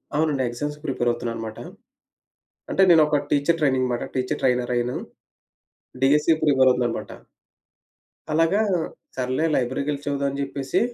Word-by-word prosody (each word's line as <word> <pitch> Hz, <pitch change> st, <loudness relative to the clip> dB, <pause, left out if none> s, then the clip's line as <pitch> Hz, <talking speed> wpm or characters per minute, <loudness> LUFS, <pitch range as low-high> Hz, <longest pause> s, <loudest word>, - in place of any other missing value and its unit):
అవునండి. 150 Hz, -3 st, +1 dB
ఆ -, -, 0 dB
ఎగ్జామ్స్‌‌కి 145 Hz, +5 st, -5 dB
ప్రిపేర్ 120 Hz, -2 st, 0 dB
అవుతున్నా 120 Hz, 0 st, -4 dB
అనమాట. 110 Hz, -1 st, -6 dB, 1.1 s
అంటే 195 Hz, -, +2 dB
నేను 165 Hz, -2 st, +7 dB
ఒక 150 Hz, -1 st, +2 dB
టీచర్ 150 Hz, +4 st, +2 dB
ట్రైనింగ్ 130 Hz, -4 st, +2 dB
మాట 120 Hz, -, -2 dB
టీచర్ 130 Hz, 0 st, -1 dB
ట్రైనర్ 125 Hz, -1 st, +1 dB
అయ్యాను. 120 Hz, +1 st, -1 dB, 1.1 s
డీఎస్సీ 150 Hz, +4 st, +4 dB
ప్రిపేర్ 130 Hz, -3 st, +4 dB
అవుతున్నా 125 Hz, -1 st, +1 dB
అనమాట. -, -, -6 dB, 1.2 s
అలాగా 165 Hz, +7 st, +3 dB, 0.5 s
సర్లే 130 Hz, +4 st, -1 dB
లైబ్రరీకెళ్లి 140 Hz, +3 st, -1 dB
చదువుదాం 140 Hz, -1 st, -1 dB
అని 140 Hz, +1 st, -4 dB
చెప్పేసి, 135 Hz, 0 st, -2 dB
135 Hz, 135 wpm, -23 LUFS, 125-150 Hz, 1.2 s, నేను